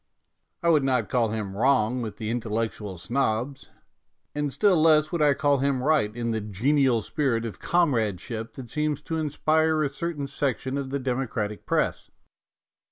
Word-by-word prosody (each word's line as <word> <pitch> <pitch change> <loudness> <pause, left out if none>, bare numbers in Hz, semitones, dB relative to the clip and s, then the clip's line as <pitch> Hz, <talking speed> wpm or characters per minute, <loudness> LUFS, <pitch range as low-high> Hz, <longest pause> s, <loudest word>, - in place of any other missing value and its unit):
I 170 - +3
would 155 -4 +4
not 125 -5 +1
call 120 -4 +1
him 105 -3 -4
wrong 125 0 +2
with 110 -3 -5
the 110 -1 -3
intellectual 110 -4 -3
snobs, 120 +6 -2 0.6
and 145 -1 -2
still 190 0 +3
less 155 -1 +4
would 170 -3 -1
I 145 -2 +4
call 145 -1 +2
him 135 -2 0
right 150 -7 +3
in 120 -1 -2
the 110 -1 -1
genial 120 +4 +1
spirit 120 -5 -1
of 110 -5 -6
comradeship 115 - 0
that 125 -4 -9
seems 150 -1 -1
to 160 - -3
inspire 155 +1 +1
a 145 - 0
certain 150 0 -4
section 135 -1 -2
of 135 -1 -4
the 140 - -1
democratic 125 -5 -3
Press. - - 0
130 Hz, 165 wpm, -26 LUFS, 115-150 Hz, 0.6 s, would